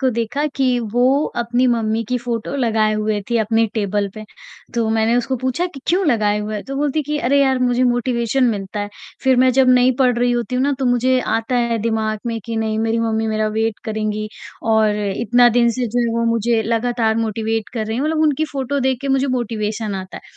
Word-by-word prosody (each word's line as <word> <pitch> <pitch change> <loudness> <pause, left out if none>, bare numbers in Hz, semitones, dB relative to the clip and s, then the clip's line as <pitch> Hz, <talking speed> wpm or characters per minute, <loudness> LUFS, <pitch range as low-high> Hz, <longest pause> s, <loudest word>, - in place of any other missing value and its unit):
को 265 - +2
देखा 235 +5 -2
कि 255 -2 +2
वो 260 +4 +3
अपनी 240 +2 +1
मम्मी 225 -2 +1
की 250 - 0
फ़ोटो 240 +1 -4
लगाए 220 -4 +1
हुए 215 -1 -1
थी 235 - +2
अपने 225 +1 +2
टेबल 205 -1 -1
पे, 215 0 -8 0.5
तो 230 -2 0
मैंने 225 +2 +2
उसको 245 +2 0
पूछा 260 +8 -1
कि 280 -7 -11
क्यों 360 +1 +2
लगाए 210 -5 +2
हुए 210 +1 -4
है? 205 - -5
तो 275 - -7
वो 280 - -2
बोलती 295 +1 0
कि 295 +2 -3
अरे 280 +2 +2
यार 265 -2 +2
मुझे 250 0 +1
मोटिवेशन 245 +1 +1
मिलता 205 -3 -2
है, 205 - -3 0.4
फ़िर 260 -1 +4
मैं 255 +1 +5
जब 265 0 +4
नहीं 250 +1 +5
पढ़ 250 -2 +2
रही 245 0 +2
होती 240 0 -2
हूँ 255 - +1
ना 285 - +1
तो 265 - -1
मुझे 250 +1 +2
आता 225 +2 0
है 235 -1 +1
दिमाग 220 -1 -1
में 230 -1 -2
कि 230 -1 -4
नहीं 220 -1 -1
मेरी 225 +1 0
मम्मी 225 -1 0
मेरा 215 0 0
वेट 220 0 -1
करेंगी 215 -1 -3 0.4
और 215 -1 +3 0.2
इतना 240 +2 +4
दिन 235 -1 +4
से 250 +1 -2
जो 240 +2 -1
है 235 - +1
वो 230 - +1
मुझे 230 0 +1
लगातार 230 0 0
मोटिवेट 225 0 -2
कर 220 -2 -2
रही 220 +1 -3
हैं, 265 - -1
मतलब 310 0 0
उनकी 310 0 +2
फ़ोटो 275 +1 -2
देख 260 -1 +1
के 275 - -4
मुझे 270 +1 +2
मोटिवेशन 220 -4 -2
आता 190 0 -7
है, - - -10
235 Hz, 225 wpm, -19 LUFS, 220-255 Hz, 0.5 s, मैं